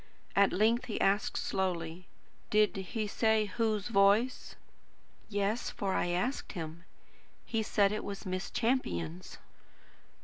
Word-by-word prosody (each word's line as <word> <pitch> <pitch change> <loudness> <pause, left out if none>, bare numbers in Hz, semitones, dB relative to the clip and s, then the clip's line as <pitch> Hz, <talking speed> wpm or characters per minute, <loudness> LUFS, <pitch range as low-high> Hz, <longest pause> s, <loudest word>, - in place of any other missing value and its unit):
At 200 0 +5
length 225 +4 +2
he 220 - -3
asked 200 +2 +2
slowly: 180 -2 -2 0.4
"Did 210 -1 +3
he 195 +3 -3
say 220 +1 +2
whose 215 0 -1
voice?" 210 +5 +3 0.7
"Yes, 205 +3 -1
for 200 -5 -2
I - - +1
asked 180 +10 -2
him. 165 0 -6 0.6
He 225 -2 -1
said 205 -2 +2
it 215 - -3
was 200 -1 -6
Miss 185 0 -3
Champion's." 90 - -2
200 Hz, 125 wpm, -32 LUFS, 185-220 Hz, 0.7 s, At